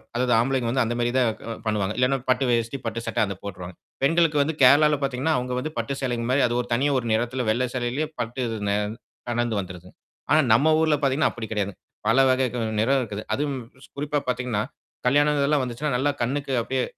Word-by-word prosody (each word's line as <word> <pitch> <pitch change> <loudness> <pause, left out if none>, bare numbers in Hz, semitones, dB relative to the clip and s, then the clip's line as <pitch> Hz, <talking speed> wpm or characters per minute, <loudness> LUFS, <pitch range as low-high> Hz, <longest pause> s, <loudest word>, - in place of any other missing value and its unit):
அதாவது 125 0 +2
ஆம்பளைங்க 130 -1 0
வந்து 130 0 +2
அந்த 120 +1 -2
மாதிரிதான் 120 0 +2
க 115 - -5
பண்ணுவாங்க. 105 -2 0
இல்லன்னா 130 +2 +2
பட்டு 130 +1 +3
வேட்டி, 115 +2 0
பட்டு 115 +1 -3
சட்டை 115 - -1
அதப் 100 -2 -7
போட்ருவாங்க. 90 -3 -7 0.3
பெண்களுக்கு 160 0 +3
வந்து 150 +2 0
கேரளால 150 +3 +6
பார்த்தீங்கன்னா, 135 +3 0
அவுங்க 125 0 -3
வந்து 155 +4 -4
பட்டு 140 - -2
சேலைங்க 120 -3 -1
மாரி 140 - +3
அது 120 - -2
ஒரு 120 - -9
தனியா 140 +4 +2
ஒரு 120 - -5
நிறத்துல 120 +2 -1
வெள்ளை 125 +3 +1
சேலையிலே 130 +5 -1
பட்டுது 120 -1 -3
நே 100 - +2 0.5
கலந்து 120 -2 0
வந்துருதுங்க. 90 -1 -8 0.4
ஆனா 155 - +6
நம்ம 155 +7 +4
ஊர்ல 155 -2 +3
பார்த்தீங்கன்னா, 140 +3 +2
அப்பிடி 115 -2 -7
கிடையாதுங்க. 100 -2 -2 0.3
பல 115 +4 +4
வகை 130 0 +3
க - - -3 0.2
நிறம் 135 +5 +3
இருக்குது. 105 -3 -5
அதுவும் 140 +2 -1 0.3
ஸ் - - -24
குறிப்பா 145 +1 -1
பார்த்தீங்கன்னா, 125 -4 -1 0.5
கல்யாணம் 145 +3 +3
இதெல்லாம் 140 +1 +2
வந்துச்சுன்னா 125 +4 -3
நல்லா 140 +3 +1
கண்ணுக்கு 135 +3 -1
அப்பிடியே 130 +2 -1
125 Hz, 195 wpm, -24 LUFS, 115-140 Hz, 0.5 s, கேரளால